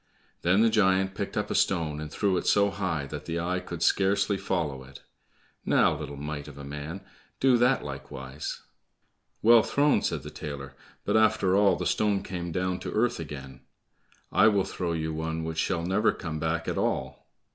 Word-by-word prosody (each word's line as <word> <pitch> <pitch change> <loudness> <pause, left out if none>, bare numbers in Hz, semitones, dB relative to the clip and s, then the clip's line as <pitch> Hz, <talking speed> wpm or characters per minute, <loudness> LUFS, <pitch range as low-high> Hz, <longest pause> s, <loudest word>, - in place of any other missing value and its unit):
Then 95 +4 +3
the 115 - +4
giant 95 -2 +3
picked - - -4
up - - -1
a - - +1
stone 80 -5 +1
and 75 0 -6
threw 100 -3 +1
it - - -2
so 100 0 +4
high 85 -8 -2
that - - -7
the 85 +1 -2
eye 90 +2 -1
could 85 -2 -5
scarcely 100 +2 +2
follow 80 -9 -2
it. 65 0 -14 0.6
"Now, - - +3
little 70 -1 -7
mite 75 0 -5
of 70 -1 -11
a 70 - -8
man, 75 +6 -6 0.4
do 130 -1 +5
that 125 +2 +3
likewise." 70 0 -7 0.8
"Well 115 +1 +8
thrown," 145 +5 +2
said - - -2
the - - -8
tailor, 70 -2 -7 0.3
"but - - +1
after 105 -4 +3
all 100 -2 +5
the 90 - -4
stone 105 0 +1
came 85 -2 -5
down 90 +1 -1
to - - -5
earth 115 -1 +1
again; 70 -4 -8 0.7
I 105 - +5
will 100 -3 +3
throw 90 -3 -3
you 80 -1 -2
one 80 +1 -3
which 80 0 -3
shall 85 -1 0
never 95 +5 +2
come 80 -3 -5
back 80 +1 -1
at - - -1
all." - - -2
85 Hz, 190 wpm, -27 LUFS, 75-100 Hz, 0.8 s, Well